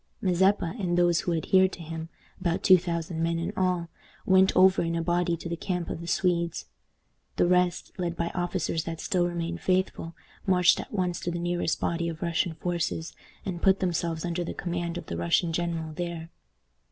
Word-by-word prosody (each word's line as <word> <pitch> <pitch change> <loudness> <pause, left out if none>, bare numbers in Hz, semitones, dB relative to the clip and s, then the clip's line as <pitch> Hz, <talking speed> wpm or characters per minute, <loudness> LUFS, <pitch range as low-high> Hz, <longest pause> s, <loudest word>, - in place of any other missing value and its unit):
Mazeppa 190 -1 +2
and 175 -3 0
those 175 -1 +4
who 175 - -1
adhered 185 +3 +3
to 170 - -8
him 165 0 -6 0.3
about 175 -2 -1
two 185 -1 +7
thousand 170 -1 -3
men 165 0 +1
in 170 - -3
all 180 -2 0 0.4
went 190 0 +5
over 190 +1 +6
in 165 0 -1
a 165 - 0
body 175 0 +1
to 170 - -7
the 170 - -2
camp 180 0 -3
of - - -5
the 170 - -7
Swedes. 170 -2 0 0.7
The - - +3
rest, 180 0 +2
led 175 -1 -1
by 170 0 -1
the - - -13
officers 175 -2 -1
that 165 -1 -5
still 175 -1 +1
remained 170 -1 -3
faithful, 185 -2 0 0.3
marched 180 -2 +5
at - - -7
once 180 -4 -1
to 175 - -3
the 175 - -2
nearest 175 -1 -1
body 170 0 -1
of 165 0 -6
Russian 170 0 0
forces, 170 -1 -2 0.3
and 175 -3 -4
put 195 0 +4
themselves 170 -2 -1
under 175 0 -1
the - - -5
command 175 -1 -3
of - - -6
the 85 - -5
Russian 85 - +1
general 165 -2 -2
there. 170 0 -5
175 Hz, 195 wpm, -27 LUFS, 165-180 Hz, 0.7 s, two